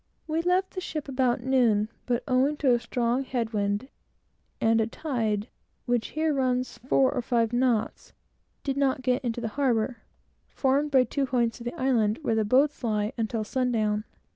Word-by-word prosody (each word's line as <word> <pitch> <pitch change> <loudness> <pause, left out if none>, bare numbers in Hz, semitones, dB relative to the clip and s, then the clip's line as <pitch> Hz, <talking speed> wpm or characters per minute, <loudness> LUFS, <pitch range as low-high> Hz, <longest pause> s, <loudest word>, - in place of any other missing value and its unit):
We 320 +1 -1
left 365 +2 +1
the 370 - -5
ship 305 -5 -5
about 255 -3 +1
noon, 240 -5 +3 0.2
but, 245 -1 0
owing 270 +3 +2
to 265 -4 +3
a 240 - +2
strong 240 +2 -1
head 240 -3 -3
wind, 205 +3 -1 0.7
and 225 0 +3
a 220 - 0
tide, 225 -6 -2 0.4
which 245 -2 0
here 315 -1 +2
runs 255 -2 -1
four 260 +1 +2
or 255 - -1
five 230 -1 0
knots, 240 -3 0 0.5
did 275 -1 -2
not 270 -2 +1
get 255 +1 +1
into 240 -1 -2
the 225 - -2
harbor, 240 -3 +1 0.5
formed 275 +2 +1
by 265 -3 +5
two 270 +3 -2
points 240 -3 0
of 235 - -9
the 240 - -5
island, 235 -5 +2
where 230 - +1
the 220 0 +2
boats 270 +7 +2
lie, 210 -2 0
until 225 -1 -2
sundown. 215 -3 0
250 Hz, 175 wpm, -27 LUFS, 225-270 Hz, 0.7 s, by